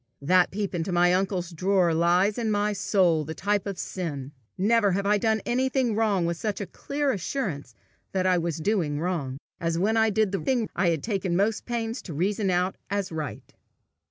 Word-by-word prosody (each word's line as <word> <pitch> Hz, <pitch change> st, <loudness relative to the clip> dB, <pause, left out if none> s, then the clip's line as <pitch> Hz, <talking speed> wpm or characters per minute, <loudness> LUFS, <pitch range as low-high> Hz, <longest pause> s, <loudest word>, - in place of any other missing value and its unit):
That 180 Hz, +5 st, +4 dB
peep 200 Hz, 0 st, -3 dB
into 175 Hz, +1 st, -2 dB
my 175 Hz, 0 st, +4 dB
uncle's 185 Hz, -1 st, -1 dB
drawer 180 Hz, 0 st, +2 dB
lies 175 Hz, +6 st, +2 dB
in 225 Hz, -2 st, 0 dB
my 210 Hz, 0 st, +1 dB
soul 180 Hz, -5 st, +2 dB
the 160 Hz, +2 st, -6 dB
type 205 Hz, 0 st, 0 dB
of 195 Hz, -2 st, -4 dB
sin. 145 Hz, -8 st, -4 dB, 0.3 s
Never 205 Hz, 0 st, +3 dB
have 200 Hz, +2 st, -1 dB
I 205 Hz, +1 st, +3 dB
done 220 Hz, +1 st, +1 dB
anything 260 Hz, -1 st, +1 dB
wrong 205 Hz, -5 st, +1 dB
with 170 Hz, 0 st, -1 dB
such 210 Hz, +1 st, -3 dB
a 200 Hz, -, -3 dB
clear 280 Hz, -, -2 dB
assurance 175 Hz, -, -3 dB, 0.4 s
that 185 Hz, -1 st, 0 dB
I 185 Hz, -1 st, +3 dB
was 170 Hz, -2 st, -2 dB
doing 160 Hz, -4 st, 0 dB
wrong, 155 Hz, -7 st, -2 dB, 0.2 s
as 165 Hz, 0 st, -1 dB
when 215 Hz, +6 st, +2 dB
I 220 Hz, 0 st, +4 dB
did 215 Hz, -1 st, +1 dB
the 195 Hz, -, -1 dB
thing 250 Hz, -5 st, 0 dB
I 175 Hz, -1 st, +2 dB
had 160 Hz, -3 st, -1 dB
taken 195 Hz, -5 st, -1 dB
most 210 Hz, +4 st, +1 dB
pains 235 Hz, 0 st, -2 dB
to 165 Hz, -, -8 dB
reason 195 Hz, +5 st, 0 dB
out 180 Hz, +1 st, 0 dB
as 200 Hz, -2 st, -2 dB
right. 155 Hz, -2 st, -6 dB
190 Hz, 195 wpm, -26 LUFS, 170-210 Hz, 0.4 s, That